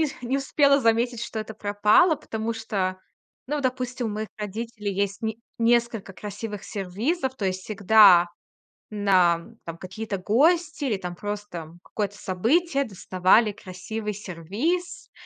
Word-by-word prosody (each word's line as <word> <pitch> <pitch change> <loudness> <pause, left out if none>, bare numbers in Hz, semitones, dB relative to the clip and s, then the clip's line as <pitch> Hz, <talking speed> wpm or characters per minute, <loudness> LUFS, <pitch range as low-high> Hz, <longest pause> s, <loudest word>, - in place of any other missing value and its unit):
нисх 310 -3 -1
не 250 +3 0
успела 280 0 +3
заметить, 235 0 +1
что 235 - -5
это 220 0 -6
пропало, 210 - +4
потому 220 -3 -4
что, 195 -4 -2 0.5
ну, 295 +2 -2
допустим, 255 -2 -2
у - - -1
моих 215 +1 -4
родителей 210 0 -4
есть 200 +1 -2
ни 220 0 -2 0.2
несколько 230 -3 +1
красивых 210 +1 -7
сервизов. 240 - -2
То 205 - -4
есть 185 0 -1
всегда 200 -3 +6 0.7
нам, 195 0 +2
там 165 0 -6
какие-то 195 +3 -5
гости 295 - +2
или 225 -7 0
там 180 -2 -6
просто, 205 -1 -5
м, 165 +2 -12
какое-то 205 -2 -4
событие, 275 - +1
доставали 195 +1 +2
красивый 210 +2 -6
сервиз. 210 - -3
215 Hz, 140 wpm, -25 LUFS, 195-240 Hz, 0.7 s, всегда